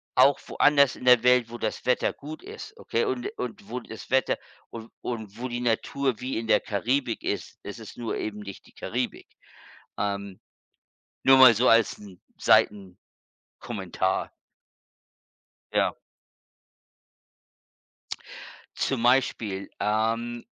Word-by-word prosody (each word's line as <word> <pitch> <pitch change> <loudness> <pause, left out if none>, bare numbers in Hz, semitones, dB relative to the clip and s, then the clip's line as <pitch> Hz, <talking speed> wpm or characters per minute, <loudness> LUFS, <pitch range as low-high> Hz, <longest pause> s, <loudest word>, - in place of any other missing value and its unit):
auch 135 +2 +5
woanders 140 -2 +4
in 125 - -10
der 125 -2 +7
Welt, 125 -2 +3
wo 120 - -7
das - - -3
Wetter 125 - +2
gut 155 +2 -9
ist, - - -10
okay? 115 - -1
Und 125 -2 -2
und 110 -4 -6
wo 125 +2 -4
das 110 -1 -10
Wetter, 130 0 +2 0.3
und 115 0 -9
und 110 -3 -5
wo 125 - -4
die 120 0 -4
Natur 125 +1 0
wie 130 -2 -3
in 115 - -6
der - - +5
Karibik 120 +4 -1
ist, - - -4
es - - -8
ist - - -11
nur 115 -2 -3
eben 105 -1 -4
nicht 100 -2 -9
die - - -20
Karibik. - - -4 0.7
Ähm, 100 -1 -3 0.8
nur 135 0 +7
mal 130 -3 +9
so 120 +4 +3
als 115 -1 +4
'n 100 -4 -13 1.2
Seitenkommentar. - - -3 1.4
Ja. - - +2 2.8
Zum 130 -4 -1
Beispiel, 115 -6 +1
ähm, 115 +3 -1
120 Hz, 130 wpm, -26 LUFS, 110-125 Hz, 2.8 s, mal